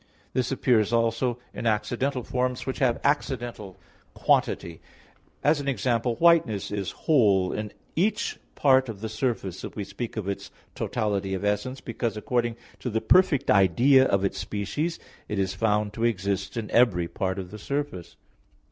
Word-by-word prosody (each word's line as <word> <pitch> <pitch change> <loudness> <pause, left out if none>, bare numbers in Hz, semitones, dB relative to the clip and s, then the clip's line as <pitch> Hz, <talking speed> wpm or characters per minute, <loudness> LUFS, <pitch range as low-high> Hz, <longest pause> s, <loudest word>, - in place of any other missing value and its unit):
This 130 0 0
appears 120 -5 +2
also 115 +1 +1 0.2
in 115 - -3
accidental 125 +4 0
forms 125 +1 -2
which 130 - -3
have 125 -4 +2
accidental 120 -9 -1 0.4
quantity; 85 -1 +1 0.6
as 150 +1 +4
an 140 - -5
example, 120 -1 0
whiteness 160 - +3
is 100 -2 -2 0.2
whole 100 - +4
in 105 -1 -4 0.2
each 195 +7 0 0.2
part 130 -2 +4
of 105 -3 -7
the 110 - -3
surface 110 -6 -2
if - - -7
we 105 - -3
speak 115 +3 -6
of 105 -3 -3
its 100 - -4 0.2
totality 100 -2 -1
of 95 - -4
essence; 105 +6 -1
because 115 -2 -3
according 120 +1 0 0.2
to 125 - -3
the 110 -1 0
perfect 180 -1 +4
idea 120 - +5
of 100 0 +1
its 100 - -2
species 145 - -2 0.3
it 105 - -3
is 95 -1 0
found 105 +1 0
to 115 - -4
exist 100 -2 -1
in 110 -2 -4
every 95 -9 +3
part 95 +1 -2
of 95 -2 -6
the 105 - -8
surface. 140 - -4
115 Hz, 160 wpm, -26 LUFS, 100-130 Hz, 0.6 s, idea